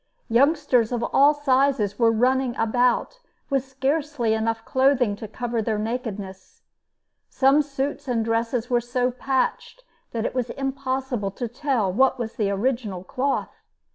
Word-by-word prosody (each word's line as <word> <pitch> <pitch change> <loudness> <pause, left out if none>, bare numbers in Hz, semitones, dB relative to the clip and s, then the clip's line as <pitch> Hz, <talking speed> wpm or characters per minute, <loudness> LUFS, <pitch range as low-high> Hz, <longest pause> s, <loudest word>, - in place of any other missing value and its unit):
Youngsters 255 -2 +3
of 240 -1 -1
all 285 +2 +6
sizes 270 -7 +1
were 230 -1 +5
running 250 +2 +1
about 245 - +1 0.3
with 270 -2 +2
scarcely 270 -2 -1
enough 225 0 -1
clothing 260 -5 +2
to 220 - -7
cover 235 +1 -3
their 220 0 -1
nakedness. 210 -4 -5 0.7
Some 275 +2 +4
suits 285 0 -4
and 230 -3 0
dresses 230 +1 -1
were 245 -1 +1
so 245 +1 -1
patched 265 - -2 0.3
that 230 -1 -2
it - - -2
was 250 -2 -2
impossible 265 -5 -2
to 235 +5 -5
tell 240 -6 -1
what 265 +5 +3
was 235 -3 -4
the 210 -3 -1
original 205 -3 -2
cloth. 265 +8 -2
245 Hz, 140 wpm, -24 LUFS, 225-270 Hz, 0.7 s, all